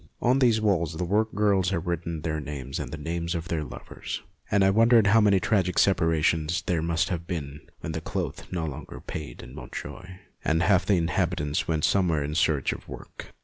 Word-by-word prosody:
On 125 +3 +3
these 120 -4 +4
walls 90 -7 +1
the 90 - -2
workgirls 105 -1 +2
had 90 -3 -2
written 85 -2 -3
their 80 -2 -1
names 70 -2 -5
and - - -5
the 80 - -5
names 85 +3 -3
of 85 0 -4
their 80 -2 -1
lovers, - - -7 0.3
and 100 -1 +3
I 95 - +5
wondered 115 +1 +5
how 110 +2 +5
many 100 -2 +5
tragic 95 -3 +1
separations 80 -2 +2
there 85 -2 0
must 85 0 0
have 85 -2 -3
been 75 -5 -5 0.2
when 80 - -4
cloth 80 - -4
no 85 -3 -2
longer 75 -4 -7
paid 75 -6 -7
in - - -11
Montjoie, 90 +6 -8 0.2
and 80 +2 +2
half 95 -1 +3
the 100 - +4
inhabitants 80 -1 0
went 80 -2 +1
elsewhere 85 -6 +2
in 75 +1 -3
search 75 -3 +2
of - - -11
work. - - -10
85 Hz, 190 wpm, -26 LUFS, 80-95 Hz, 0.3 s, I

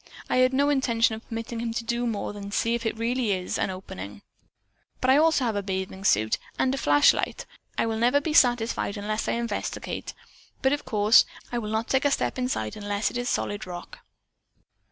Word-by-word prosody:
I - - +3
had 255 0 +5
no 280 +2 +2
intention 235 -5 +2
of 220 +1 -8
permitting 230 0 -5
him 230 -1 -3
to 235 - -2
do 235 +1 -1
more 215 -2 -3
than 200 -1 -7
see 230 +3 +1
if 235 -1 -1
it 225 - -3
really 230 -1 0
is 185 -1 -3
an - - 0
opening. 100 - -8 0.8
I 260 +2 +5
also 315 -4 +3
have 225 -3 0
a 205 - 0
bathing 190 0 -4
suit 110 - +3 0.2
and 260 - +2
a - - -2
flashlight. 145 0 +3 0.3
I - - +2
never 230 +3 +1
will 285 - +5
be 305 +1 -2
satisfied 240 -6 +3
unless 215 +2 -2
I - - +1
investigate, 235 0 -4 0.5
but 265 +1 +4
of 290 - -3
course 215 -1 +5 0.3
I 240 - -1
will 210 -2 -5
not 220 +1 -1
take 265 +1 +1
a - - +5
step 275 - -1
inside 180 - -2
unless 205 0 -1
it - - -4
is 245 - -2
solid 205 -1 -2
rock." 180 - -8
230 Hz, 200 wpm, -26 LUFS, 205-250 Hz, 0.8 s, had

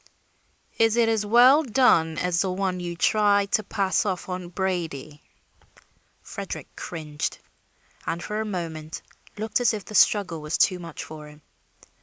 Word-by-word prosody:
"Is 225 -1 +4
it 235 -1 +4
as 215 -2 0
well 250 +7 +7
done 220 - +3
as 180 -1 +1
the 190 - 0
one 185 -1 -2
you 175 -1 -5
tried 205 +1 +2
to - - +2
pass 195 -1 0
off 190 -3 -3
on 180 -1 -5
Brady?" 165 -6 -3 1.0
Frederick - - -7
cringed, 150 -3 -5 0.7
and 170 - -2
for 210 +1 -3
a - - -1
moment 165 -5 -5 0.3
looked 215 +2 -1
as 235 -2 +3
if 205 - -7
the - - -10
struggle 185 -4 +3
was 150 +1 -2
too 185 -2 +3
much 165 -2 -7
for 155 -1 -10
him. 150 0 -16
185 Hz, 155 wpm, -25 LUFS, 165-210 Hz, 1.0 s, well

